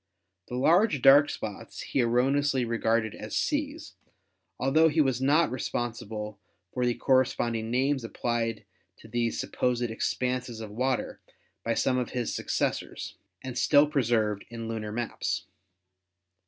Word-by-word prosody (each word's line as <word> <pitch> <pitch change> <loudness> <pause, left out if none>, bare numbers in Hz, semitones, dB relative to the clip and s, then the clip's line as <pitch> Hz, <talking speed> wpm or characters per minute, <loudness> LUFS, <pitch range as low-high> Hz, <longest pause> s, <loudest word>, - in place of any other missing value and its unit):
The 125 - -5
large 160 - +3
dark 140 +2 +8
spots 105 -2 -6
he 135 - 0
erroneously 130 +2 +2
regarded 115 -1 0
as 105 - -6
seas, 300 +2 -2 0.7
altho 155 +5 +4
he 160 +1 0
was 130 -4 +2
not 150 +4 +3
responsible 110 -4 -4 0.3
for 125 -1 0
the 120 - +1
corresponding 120 -4 +1
names 130 +2 +1
applied 115 -1 -2 0.3
to - - -15
these 120 -1 -1
supposed 125 -1 -1
expanses 120 +1 -2
of 110 -2 -7
water 125 +3 -2 0.4
by 115 0 0
some 130 -1 +1
of 125 - -4
his 120 -2 -1
suc - - -5
cessors, - - -2 0.3
and 130 -2 -6
still 145 0 +5
preserved 115 -8 +1
in 115 -1 -6
lunar 110 -2 -4
maps. 120 +2 -3
125 Hz, 135 wpm, -28 LUFS, 115-135 Hz, 0.7 s, dark